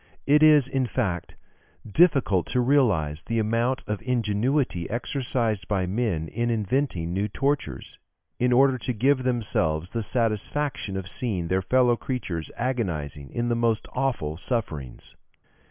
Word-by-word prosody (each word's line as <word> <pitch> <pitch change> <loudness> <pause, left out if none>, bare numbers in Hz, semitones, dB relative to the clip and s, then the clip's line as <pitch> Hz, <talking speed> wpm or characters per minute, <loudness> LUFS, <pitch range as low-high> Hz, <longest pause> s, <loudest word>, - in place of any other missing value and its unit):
It 150 +2 +4
is, 150 -4 +6
in 135 -2 0
fact, 95 -8 -2 0.5
difficult 135 - +3
to 125 - 0
realise 105 - +2
the 115 +4 -3
amount 115 +4 0
of 105 -1 -3
ingenuity 120 - 0
exercised 120 -3 -1
by 95 -3 0
men 95 -5 -1
in 120 +7 -2
inventing 105 - -1
new 100 +3 0
tortures, 135 - -2 0.4
in 125 +1 +2
order 130 +1 +4
to 125 - -2
give 130 +4 +2
themselves 95 -10 0
the 115 - -2
satisfaction 115 0 -1
of 95 -1 -5
seeing 95 -6 -2
their 95 +1 +1
fellow 125 +4 +3
creatures 95 - -4
agonizing 85 - -3
in 120 - -2
the 120 - +1
most 115 -2 0
awful 125 - -1
sufferings." 80 - -4
115 Hz, 140 wpm, -25 LUFS, 95-130 Hz, 0.5 s, is